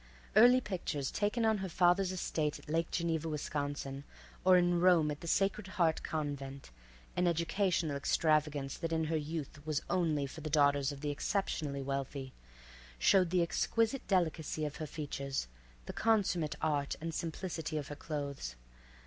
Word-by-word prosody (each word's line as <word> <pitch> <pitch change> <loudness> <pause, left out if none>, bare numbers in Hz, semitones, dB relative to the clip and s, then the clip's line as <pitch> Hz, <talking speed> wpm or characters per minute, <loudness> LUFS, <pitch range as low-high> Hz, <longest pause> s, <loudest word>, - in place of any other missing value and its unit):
Early 245 +4 +7
pictures 170 - -3
taken 210 +3 0
on 220 -2 +3
her 190 -1 -3
father's 180 +2 +3
estate 155 -4 -1
at - - -16
Lake 165 +2 0
Geneva, 165 -2 -1
Wisconsin, 145 -2 -3 0.4
or 185 0 +7
in 175 -1 +3
Rome 170 -4 +5
at 145 - -6
the 170 - -7
Sacred 195 +2 +1
Heart 165 -3 +3
Convent—an 135 - -4
educational 170 -1 +1
extravagance 150 -1 +1
that 165 - -3
in 160 0 +1
her 160 +1 -1
youth 150 -1 -4
was 155 -1 -1
only 155 -6 +1
for 140 +4 -8
the 155 - -4
daughters 145 -1 +3
of 140 -1 -8
the 145 -1 -1
exceptionally 145 -4 -2
wealthy—showed 65 - -1
the 180 0 +3
exquisite 225 +8 0
delicacy 160 -5 0
of 150 - -5
her 155 - -4
features, 140 - -4 0.4
the - - -6
consummate 195 -8 +1
art 145 -2 0
and 165 +1 -4
simplicity 160 -1 -3
of 145 -2 -4
her 145 - -5
clothes. 140 - -5
155 Hz, 150 wpm, -33 LUFS, 140-175 Hz, 0.4 s, Early